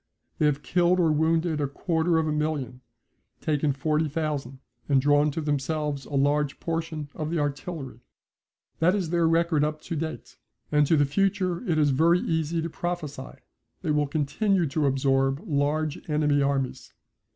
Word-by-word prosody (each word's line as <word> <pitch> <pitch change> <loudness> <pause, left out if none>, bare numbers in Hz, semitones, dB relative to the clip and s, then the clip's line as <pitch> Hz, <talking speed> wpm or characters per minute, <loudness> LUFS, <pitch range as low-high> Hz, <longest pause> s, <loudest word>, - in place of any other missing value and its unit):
They 155 - +4
have 145 0 -1
killed 180 +1 +2
or 165 -3 +3
wounded 160 0 +1
a 145 - +1
quarter 165 +3 0
of 160 -1 +1
a - - 0
million, 150 -5 -2 0.6
taken 150 -1 0
40,000, 150 -2 -1 0.3
and 140 -2 +4
drawn 145 +2 +3
to 155 +3 -3
themselves 150 -1 -2
a 145 - -6
large 145 +1 +1
portion 165 -3 -3
of 155 -1 -4
the 170 - -1
artillery. 145 -3 -4 0.8
That 180 +4 +3
is 180 -6 -2
their 170 -1 +3
record 165 -2 +2
up 155 0 -1
to 170 - -5
date. 160 +1 -5 0.3
As 150 -1 +3
to 160 - +4
the 145 - +4
future 185 - 0
it 160 - +2
is 150 -2 +3
very 165 +6 +4
easy 160 0 -1
to 165 - -3
prophesy. 155 -7 -5 0.5
They 160 - 0
will 150 -1 +2
continue 165 +6 +1
to 145 +1 +1
absorb 135 0 +1
large 150 +1 0
enemy 150 -1 +2
armies. 135 -2 -2
150 Hz, 160 wpm, -26 LUFS, 145-165 Hz, 0.8 s, They